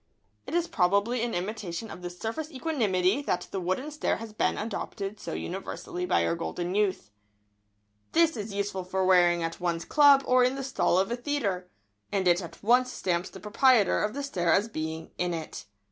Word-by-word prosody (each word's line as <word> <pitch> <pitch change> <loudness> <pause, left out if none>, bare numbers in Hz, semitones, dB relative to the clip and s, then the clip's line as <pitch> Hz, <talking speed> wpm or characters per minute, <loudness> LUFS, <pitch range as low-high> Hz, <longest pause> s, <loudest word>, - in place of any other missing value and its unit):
] 105 +3 -43
It 315 - -3
is 345 0 +1
probably 200 - +1
in 235 0 -1
imitation 195 +1 -4
of - - -9
this 175 0 -7
surface 285 - -4
equanimity 245 - +1
that 180 -10 -2
the 195 - -2
wooden 185 - -2
stare 300 - 0
has 225 -1 -8
been - - 0
adopted 210 -1 -4
so - - -6
universally 180 -1 -5
by 85 - +2
our 85 - +1
golden 175 - -3
youth. 200 - 0
[Sidenote: - - -45 1.0
The - - +2
wooden 335 - +7
stare.] 260 -9 -5
This - - -8
is 200 - -7
useful 200 -2 -2
for 190 +1 -1
wearing 175 -2 +4
at 165 0 -4
one's 170 -2 -1
club 285 -2 +6
or 255 0 +4
in 255 +2 +2
the 270 - -4
stall 250 -8 +1
of 195 +4 +1
a - - +1
theatre, 235 -9 -2 0.4
and 190 -2 0
it 175 +1 +4
at 170 +1 -10
once 250 +3 +4
stamps 175 -4 -1
the 190 - -11
proprietor 215 0 +3
of 210 +3 -2
the 285 - -3
stare 175 -11 0
as 205 +3 +3
being 160 -5 -5
"in 180 -1 0
it." 155 -11 -7
195 Hz, 210 wpm, -28 LUFS, 175-245 Hz, 1.0 s, wooden